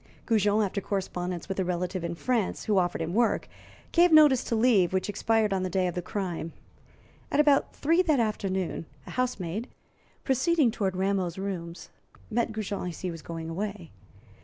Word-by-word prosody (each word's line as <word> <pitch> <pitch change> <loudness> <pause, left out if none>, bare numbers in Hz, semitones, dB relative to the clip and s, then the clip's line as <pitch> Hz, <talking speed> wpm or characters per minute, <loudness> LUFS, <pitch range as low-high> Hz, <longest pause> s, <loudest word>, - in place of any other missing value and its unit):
Goujon, 215 -1 +3
after 200 +1 -3
correspondence 180 -3 -3
with 190 0 -3
a - - +2
relative 180 0 -2
in 170 0 -3
France 230 +2 -1
who 205 -3 +3
offered 175 -2 0
him 165 +2 -4
work, 235 +2 +2 0.4
gave 350 0 +5
notice 295 -5 +7
to 235 - -1
leave, 220 -7 +3
which 190 +1 0
expired 215 0 +1
on 190 - 0
the 185 - -1
day 185 0 +1
of 180 - -1
the 180 - -3
crime. 175 -4 -4 0.8
At - - +1
about 290 -2 +3
three 330 +5 +3
that 310 -7 +2
afternoon 190 -6 -1 0.2
a - - -9
housemaid, 225 -4 -2 0.6
proceeding 270 0 +2
toward 195 -5 -1
Rameau's 190 -2 0
rooms, 180 -3 -5 0.4
met 235 +1 0
Goujon 205 -4 -3
as 170 - -9
he 185 - -2
was 165 -1 -8
going 165 0 -6
away. 190 0 -5
195 Hz, 175 wpm, -28 LUFS, 180-230 Hz, 0.8 s, notice